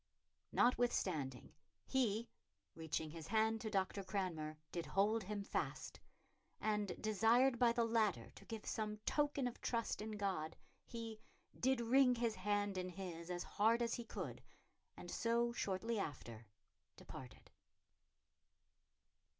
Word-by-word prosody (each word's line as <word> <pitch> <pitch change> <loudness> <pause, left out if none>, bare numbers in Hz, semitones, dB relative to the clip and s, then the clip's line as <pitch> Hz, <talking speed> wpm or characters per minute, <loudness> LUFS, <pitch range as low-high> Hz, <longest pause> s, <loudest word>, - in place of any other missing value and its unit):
"Notwithstanding... 185 - +1 0.3
he, 235 -3 +1 0.5
reaching 160 -1 -3
his 160 -1 -7
hand 220 +2 +2
to 220 - -2
Dr. 195 -1 0
Cranmer, 180 -6 -2
did 170 -1 -3
hold 210 +4 +3
him 205 +1 -3
fast," - - -3 0.6
and, 210 -3 0
desired 230 +4 +4
by 240 -2 +6
the 235 0 +2
latter 220 -5 +1
to - - -14
give 225 -2 -6
some 215 -1 -2
token 290 -2 +2
of 245 - -6
trust 230 -3 -1
in 215 0 -4
God, 190 -7 -1 0.3
he 225 -2 -6 0.4
"did 260 0 +3
wring 250 +2 +5
his 230 -1 +1
hand 205 0 0
in 185 0 -3
his 175 -2 -6
as 175 0 -2
hard 230 +3 +3
as 230 - 0
he 240 - -2
could, - - -5 0.6
and - - -7
so, 235 0 +2
shortly 220 +1 -1
after, 120 - -5 0.5
departed." 125 -4 -10
215 Hz, 130 wpm, -40 LUFS, 185-230 Hz, 0.6 s, by